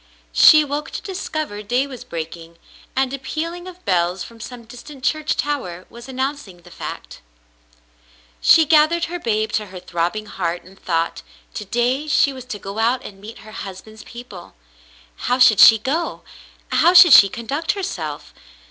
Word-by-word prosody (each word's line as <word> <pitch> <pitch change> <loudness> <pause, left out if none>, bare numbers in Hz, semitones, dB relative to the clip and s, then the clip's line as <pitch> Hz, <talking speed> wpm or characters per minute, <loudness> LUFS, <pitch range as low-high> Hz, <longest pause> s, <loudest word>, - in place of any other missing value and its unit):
She 305 - +8
awoke 295 0 -4
to - - -6
discover 310 - -5
day 245 +6 0
was 260 -4 -10
breaking, 165 0 -8 0.4
and 265 0 0
a 275 - -4
pealing 335 +6 -5
of 365 0 -13
bells 180 -1 0
from 230 -1 -13
some 240 +1 -9
distant 255 +4 -12
church 310 +1 0
tower 185 -12 -3
was 235 +2 -12
announcing 260 -9 -5
the 175 - -16
fact. - - -8 1.2
She 320 - +6
gathered 310 +3 +3
her 350 +1 -6
babe 220 -5 -1
to 210 0 -2
her 185 -1 -10
throbbing 180 +4 -3
heart 175 -4 -4
and 190 +2 -18
thought, 165 -1 -2 0.3
to 210 - -6
day 245 +7 -1
she 285 -1 +2
was 260 -2 -10
to 250 -4 -6
go 200 +2 -7
out 240 +3 +1
and 195 -1 -11
meet 215 +1 -11
her 215 - -12
husband's 215 +2 -9
people. 235 -7 -12 0.7
How 250 - +2
should 240 -5 +5
she 225 - +9
go? 285 +10 -3 0.5
How 350 +2 +4
should 355 -4 +9
she 200 - +9
conduct 275 - -3
herself 175 - -6
235 Hz, 165 wpm, -20 LUFS, 195-290 Hz, 1.2 s, she